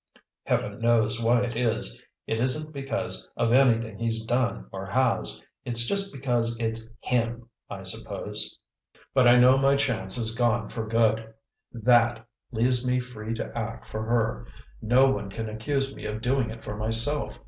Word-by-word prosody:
Heaven - - -1
knows 115 -1 +2
why 120 +2 +3
it 120 -2 -3
is; 115 -2 -1 0.2
it 110 - -2
isn't 150 +6 0
because 135 -1 -4
of 115 - +1
anything 115 -5 +3
he's 115 -1 -1
done 120 +1 -1
or 95 0 -6
has, 115 - 0 0.2
it's 120 -1 +2
just 200 +6 0
because 120 -4 -1
it's 115 0 -2
HIM, 120 -1 -1 0.2
I - - -7
suppose, - - -3 0.6
but 130 -2 +5
I 120 +1 +7
know 130 +2 +6
my 135 0 +4
chance 125 -8 +2
is 115 -2 0
gone 120 -2 +1
for 110 -2 -5
good! 110 0 +1 0.4
THAT 120 0 +2 0.2
leaves 125 +1 +1
me 125 0 +1
free 115 -3 -6
to - - -6
act 115 -1 -5
for 110 - -5
her; 115 +1 -1 0.3
no 125 +4 +4
one 100 -6 -3
can 110 +3 -5
accuse 135 +5 -2
me - - -9
of 105 0 -4
doing 125 0 0
it 115 0 -9
for 105 - -5
myself. 115 +7 +1
115 Hz, 165 wpm, -26 LUFS, 110-125 Hz, 0.6 s, I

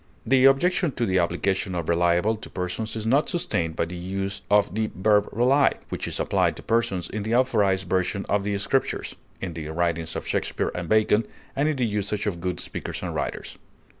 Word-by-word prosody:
The 130 +2 +4
objection 160 +3 +3
to 120 - 0
the 95 -2 +2
application 90 +2 0
of 85 -2 -3
reliable 85 +5 +2
to 110 - -10
persons 90 +5 -3
is 110 -1 -4
not 135 +7 +3
sustained 85 - -1
by - - 0
the 85 +2 -7
use 95 +3 -4
of 105 -3 +3
the 110 0 0
verb 105 +1 +3
"rely," 135 +5 +3
which - - -4
is - - -3
applied - - +1
to - - -11
persons 110 -6 0
in 110 - -4
the 110 +3 0
authorized 105 -7 +2
version 95 +2 0
of 100 -1 +1
the 100 0 -1
Scriptures, 130 +7 -1 0.3
in 90 -3 -4
the 80 -1 -6
writings 85 0 -1
of - - -4
Shakespeare - - -1
and 90 -2 -5
Bacon, 110 0 +3 0.3
and 145 +3 +2
in 155 - 0
the 125 -2 +1
usage 105 -1 -2
of 90 -5 -2
good 90 0 -2
speakers - - -5
and - - -3
writers. - - -4
100 Hz, 200 wpm, -25 LUFS, 90-115 Hz, 0.3 s, The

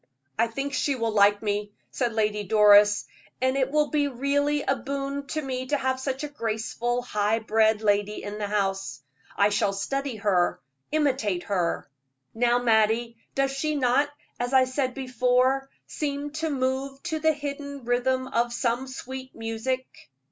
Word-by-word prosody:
"I 230 - +4
think 275 +5 -4
she 280 +1 +1
will 230 -2 -1
like 205 0 +4
me," 205 0 -2 0.2
said 245 -3 -1
Lady 210 -1 0
Doris, 205 0 +6 0.3
"and 260 +1 +1
it 265 -1 +1
will 300 0 +2
be 290 -1 +2
really 285 +2 0
a 270 - +1
boon 275 +2 -4
to 310 +2 -2
me 260 -1 -3
to 290 - +1
have 260 -1 -1
such 265 +1 -3
a - - -2
graceful, 240 -1 -2
high 210 -2 +1
bred 220 -1 +2
lady 205 0 +1
in 205 +1 -6
the 205 - -2
house. 195 -9 -2 0.3
I 200 +1 +5
shall 205 -1 +1
study 275 +6 -2
her, 200 -5 +1 0.3
imitate 260 - +1
her. 180 -4 -1 0.5
Now, 240 +1 +3
Mattie, 230 0 +2 0.2
does 275 0 +1
she 300 +3 -1
not, 275 +1 +2 0.3
as 245 +2 -2
I 260 -1 +7
said 255 0 -2
before, 255 +1 +1 0.2
seem 290 -1 -3
to 315 +1 -2
move 270 0 -2
to 320 -2 -2
the 315 0 +3
hidden 280 -2 -6
rhythm 255 +2 +1
of 235 -1 0
some 240 +2 -1
sweet 260 0 -8
music?" 225 +3 -2
255 Hz, 160 wpm, -26 LUFS, 220-275 Hz, 0.5 s, I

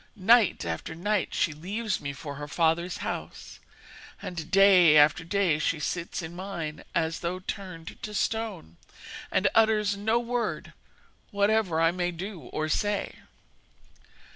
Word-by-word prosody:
Night 220 - +4
after 85 - -4
night 205 +3 -1
she 155 - +1
leaves 200 +7 -3
me 140 - -4
for 140 +1 -7
her 145 0 -6
father's 165 +3 0
house, - - -6 0.6
and 170 -2 -6
day 185 -5 +7
after 150 +3 +5
day 175 -3 +1
she 155 0 0
sits 170 +3 -3
in 165 +2 -7
mine 175 -5 -5
as 160 -1 0
though 175 +1 -3
turned 185 -3 -7
to 210 -1 -6
stone, 210 - -2 0.5
and - - +2
utters 215 -2 +3
no 220 +3 +1
word, 240 0 -3 0.6
whatever 205 -4 +1
I 165 0 +4
may 175 0 -1
do 180 +2 -6
or 155 +5 -3
say.' 205 +6 -1
180 Hz, 140 wpm, -27 LUFS, 160-205 Hz, 0.6 s, day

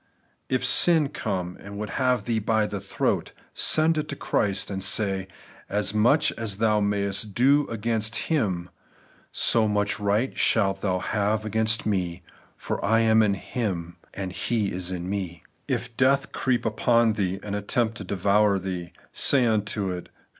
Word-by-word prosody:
If 130 -1 0
sin 160 -5 +6
come, 90 -8 -4
and 100 0 -9
would 105 -1 -5
have 125 +1 0
thee 115 -2 0
by 110 0 +1
the 105 -1 -4
throat, 100 0 -2 0.2
send 155 0 +2
it 150 - -4
to 140 - -3
Christ, 100 -7 -1
and 95 -1 -4
say, 95 -1 +1 0.4
As 105 0 0
much 120 +8 +3
as 110 -4 -3
thou 105 -1 +2
mayest 100 0 -1
do 140 +4 +3
again^ 115 0 -1
Him, 95 - -1 0.8
«ro 115 -2 +3
much 105 0 0
right 105 +5 0
shalt 95 -3 +1
thou 95 -3 0
have 105 +3 -1
against 110 +1 +1
me; 90 -4 -2 0.3
for - - -4
I 115 +2 +3
am 110 0 +4
in 100 -2 +2
Him, 90 -6 -4 0.2
and 95 -2 -5
He 110 0 -1
is 90 0 -3
in 90 -1 -5
me. 95 -4 -4 0.2
If 115 - -3
death 135 +1 +2
creep 125 -2 -1
upon 115 +1 +2
thee 95 -3 -2
and 105 -1 -4
attempt 110 +2 -1
to - - -7
devour 100 +2 +2
thee, 90 -2 -5 0.2
say 135 -3 +3
unto 105 -3 -1
it. 90 -1 -7
105 Hz, 160 wpm, -25 LUFS, 95-115 Hz, 0.8 s, sin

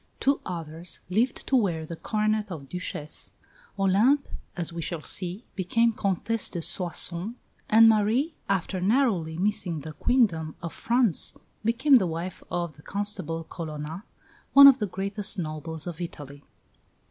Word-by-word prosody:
two 275 +1 +2
others 165 -1 -3
lived 230 +7 0
to 270 - +1
wear 175 -10 +1
the 165 - -7
coronet 215 +2 -1
of 145 -5 -7
Duchess; 155 -3 -3 0.4
Olympe, 210 +9 +3 0.3
as 170 -1 -3
we 170 - -4
shall 165 -1 -5
see, 185 +4 -1
became 230 +5 +1
Comtesse 210 +2 -1
de 170 -2 -5
Soissons; 180 +4 0 0.3
and 225 +1 +7
Marie, 225 +8 +2 0.2
after 190 -1 -1
narrowly 190 -7 +1
missing 180 -4 -1
the 155 +2 -8
Queendom 165 - +1
of 170 -2 -6
France, 235 - +2 0.3
became 250 +5 +4
the 190 - 0
wife 170 +2 -5
of 170 -4 -3
the - - -15
Constable 190 -4 -1
Colonna, 160 +2 -7 0.5
one 280 0 +10
of 275 -2 +9
the 210 - -1
greatest 200 +3 0
nobles 160 -1 -5
of 175 -1 -6
Italy. 145 -4 -8
185 Hz, 145 wpm, -26 LUFS, 165-220 Hz, 0.5 s, one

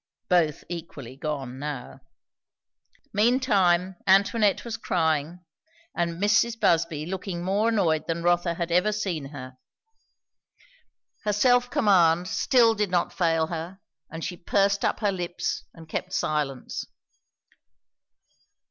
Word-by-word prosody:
Both 165 -5 +2
equally 160 -7 -8
gone 135 -3 -5
now. 145 -3 -6 1.1
Meantime 200 -6 +2
Antoinette 200 +3 +3
was 230 -1 -4
crying, 165 -3 -1 0.5
and 170 0 -2
Mrs. 225 +3 +2
Busby 165 -6 +1
looking 180 -1 -5
more 200 +5 +1
annoyed 170 -9 +1
than 170 0 -2
Rotha 175 0 +2
had 170 0 -3
ever 180 +5 +3
seen 190 -8 -3
her. 130 -2 -9 1.7
Her 210 - 0
self 245 +3 +3
command 180 -6 +3
still 230 +3 +3
did 210 -2 -1
not 180 -1 0
fail 165 -2 +1
her, 170 +4 -6 0.3
and 165 0 -5
she 180 0 -5
pursed 200 +2 +1
up - - 0
her 205 -2 +2
lips 175 -2 -3
and 165 -1 -14
kept - - -4
silence. 145 -4 -2
175 Hz, 120 wpm, -26 LUFS, 160-205 Hz, 1.7 s, Antoinette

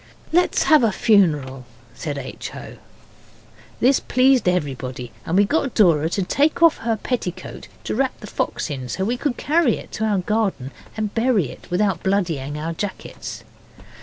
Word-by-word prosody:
'Let's 355 +2 +3
have 310 -5 +5
a 225 - +3
funeral,' 150 - +2 0.3
said 145 +4 -5
H. 135 -1 -7
O. - - -9 1.0
This 265 +2 +4
pleased 255 -5 +3
everybody, 130 -7 -3 0.2
and 170 - +1
we 205 - +5
got 275 +2 0
Dora 165 -7 +4
to 195 +2 -1
take 295 - +1
off 330 -1 +6
her 225 -1 -1
petticoat 210 -6 -4 0.2
to - - -3
wrap 265 +3 -1
the - - -9
fox 185 - -3
in, 130 -3 -5
so 190 - -2
that - - 0
we 235 +4 0
could 250 0 -2
carry 305 -5 +2
it - - -11
to 220 - -2
our 210 -2 +1
garden 190 - -1 0.3
and 215 -1 -2
bury 225 - +1
it - - -14
without 185 -1 +1
bloodying 165 -8 -1
our 160 +2 -3
jackets. 200 +4 -6
200 Hz, 170 wpm, -22 LUFS, 155-240 Hz, 1.0 s, off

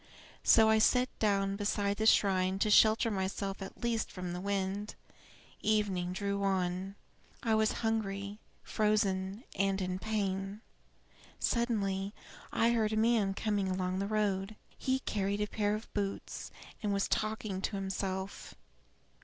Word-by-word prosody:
So 220 -1 +7
I 220 0 +5
sat 250 +3 +4
down 200 -2 +1
behind 205 -1 0
the 220 - +1
shrine 190 -3 +4
to 210 +2 +1
shelter 220 +2 +5
myself 195 0 -2
at 195 - -8
least 235 -2 0
from 180 -2 -5
the 180 - -4
wind. 200 +1 -2 0.7
Evening 205 -4 +1
drew 200 +1 -2
on. 190 0 -1 0.5
I 225 -3 +2
was 220 0 +3
hungry, 200 -2 -2 0.2
frozen, 205 -1 0
and 195 0 +1
in 185 -1 -2
pain. 195 -1 -2 0.8
Suddenly 205 -4 0 0.4
I 230 +1 +3
heard 220 -2 +1
a - - 0
man 220 -3 +3
coming 205 -3 0
along 185 0 -1
the 200 - -1
road. 205 -1 0 0.2
He 260 0 0
carried 200 -3 -1
a 210 - +1
pair 210 0 0
of 215 +2 -8
boots, 200 -1 -3 0.3
and 210 -3 0
was 200 0 +1
talking 215 -3 -1
to 200 - -2
himself. 190 0 -4
200 Hz, 140 wpm, -32 LUFS, 195-215 Hz, 0.8 s, So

